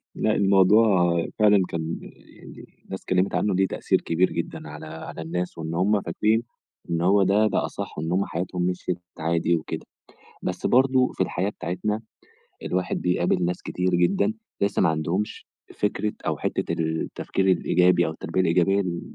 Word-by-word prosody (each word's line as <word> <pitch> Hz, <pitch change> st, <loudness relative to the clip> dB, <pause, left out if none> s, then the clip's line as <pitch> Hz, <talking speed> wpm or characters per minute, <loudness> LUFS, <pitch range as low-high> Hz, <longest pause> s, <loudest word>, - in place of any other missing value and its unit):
لأ 110 Hz, 0 st, +1 dB
الموضوع 95 Hz, -2 st, +4 dB, 0.2 s
فعلًا 105 Hz, -2 st, +5 dB
كان 80 Hz, 0 st, -3 dB
يعني -, -, -14 dB, 0.2 s
الناس -, -, -6 dB
اتكلّمت 95 Hz, +2 st, 0 dB
عنّه 105 Hz, -, +1 dB
ليه 95 Hz, 0 st, +3 dB
تأثير -, -, 0 dB
كبير 85 Hz, +3 st, +1 dB
جدًا 75 Hz, -, -5 dB
على 75 Hz, 0 st, -9 dB
على 80 Hz, +1 st, -8 dB
الناس 90 Hz, +2 st, -3 dB
وإن 80 Hz, 0 st, -4 dB
هم 100 Hz, +3 st, +2 dB
فاكرين، 110 Hz, +7 st, +1 dB, 0.5 s
إن 85 Hz, 0 st, 0 dB
هو 95 Hz, +2 st, +4 dB
ده 105 Hz, +3 st, +3 dB
ده -, -, 0 dB
أصَح -, -, -6 dB
إن 80 Hz, +2 st, -3 dB
هم 95 Hz, +2 st, +1 dB
حياتهم 90 Hz, +1 st, -3 dB
مِشْيت 90 Hz, 0 st, -1 dB, 0.2 s
عادي 85 Hz, +1 st, +1 dB
وكده. 80 Hz, -, -5 dB, 0.6 s
بس -, -, -2 dB
برضه 130 Hz, 0 st, +3 dB
في -, -, 0 dB
الحياة 95 Hz, +1 st, -1 dB
بتاعتنا، 105 Hz, +5 st, -3 dB, 0.6 s
الواحد 90 Hz, 0 st, -1 dB
بيقابل 90 Hz, 0 st, +1 dB
ناس 90 Hz, 0 st, -2 dB
كتير 90 Hz, 0 st, -1 dB
جدًا، 195 Hz, -, +2 dB, 0.3 s
لسّه 100 Hz, 0 st, +1 dB
ما 90 Hz, -, +4 dB
عندهمش 85 Hz, +6 st, -2 dB, 0.3 s
فكرة 105 Hz, +1 st, -1 dB
أو -, -, 0 dB
حتّة -, -, -2 dB
التفكير 80 Hz, +4 st, -1 dB
الإيجابي 90 Hz, -1 st, +3 dB
أو -, -, -2 dB
التربية 80 Hz, +3 st, -2 dB
الإيجابية 95 Hz, +3 st, +3 dB
م 85 Hz, -2 st, -3 dB
90 Hz, 160 wpm, -25 LUFS, 85-100 Hz, 0.6 s, فعلًا